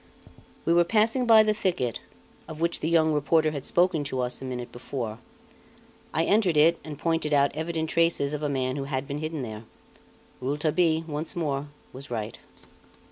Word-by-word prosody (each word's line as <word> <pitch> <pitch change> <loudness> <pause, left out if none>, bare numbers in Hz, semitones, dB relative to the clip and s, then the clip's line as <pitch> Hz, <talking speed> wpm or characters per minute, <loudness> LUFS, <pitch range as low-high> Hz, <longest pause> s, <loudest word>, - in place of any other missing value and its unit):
We 165 - +3
were 175 0 +5
passing 225 +6 +2
by 220 -1 +8
the 215 0 +2
thicket, 175 - -1 0.5
of 155 -1 -8
which 170 +1 0
the 160 - -1
young 160 -2 +3
reporter 155 +1 +2
had 140 -3 -5
spoken 175 -3 +2
to 130 -2 -2
us 125 0 -3
a - - -6
minute 125 -2 -5
before. 120 -3 -5 0.9
I 160 - +1
entered 195 -4 +2
it 165 +3 +5
and 150 -2 -7
pointed 165 -1 0
out 140 -1 +3
evident 160 0 -2
traces 165 -4 +2
of 150 - -3
a 150 - -1
man 130 -1 -1
who 135 - -3
had 135 -1 -3
been 140 +1 -4
hidden 155 -2 -4
there. 110 -2 -7 0.8
Rouletabille, 155 +4 +1
once 155 0 -4
more, 145 -4 -2 0.3
was 135 +2 -9
right. 110 -2 -4
155 Hz, 180 wpm, -26 LUFS, 135-170 Hz, 0.9 s, by